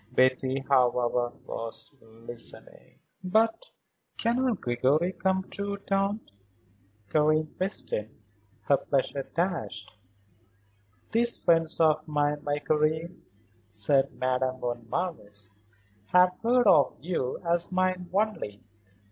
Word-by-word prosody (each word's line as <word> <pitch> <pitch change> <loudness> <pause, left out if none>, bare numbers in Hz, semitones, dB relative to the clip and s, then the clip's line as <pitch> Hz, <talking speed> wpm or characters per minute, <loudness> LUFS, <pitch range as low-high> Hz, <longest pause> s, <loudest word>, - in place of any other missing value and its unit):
Betty, 130 +1 +2
however, 125 -2 +2
was 115 +5 -4
listening. 115 +1 -7 0.3
"But 225 - +2 0.5
cannot 240 -1 +1
Gregory 135 +8 +1
come, 190 0 0
too, 200 +1 -4
Tante?" 195 - -1 0.8
Karen 155 0 +2
questioned, 125 - -3 0.5
her 140 - +3
pleasure 140 0 -1
dashed. 110 - -2 1.2
"These 235 +1 +1
friends 165 -1 +3
of 155 -1 +3
mine, 150 -1 0
my 145 -1 0
Karen," 155 +3 0 0.5
said 110 +7 +2
Madame 130 0 0
von 120 -2 -4
Marwitz, 105 - -4 0.6
"have 180 0 +5
heard 245 +2 +3
of 150 -8 +5
you 145 -4 -2
as 170 +1 0
mine 185 -1 0
only. 195 - -1
155 Hz, 100 wpm, -28 LUFS, 125-185 Hz, 1.2 s, have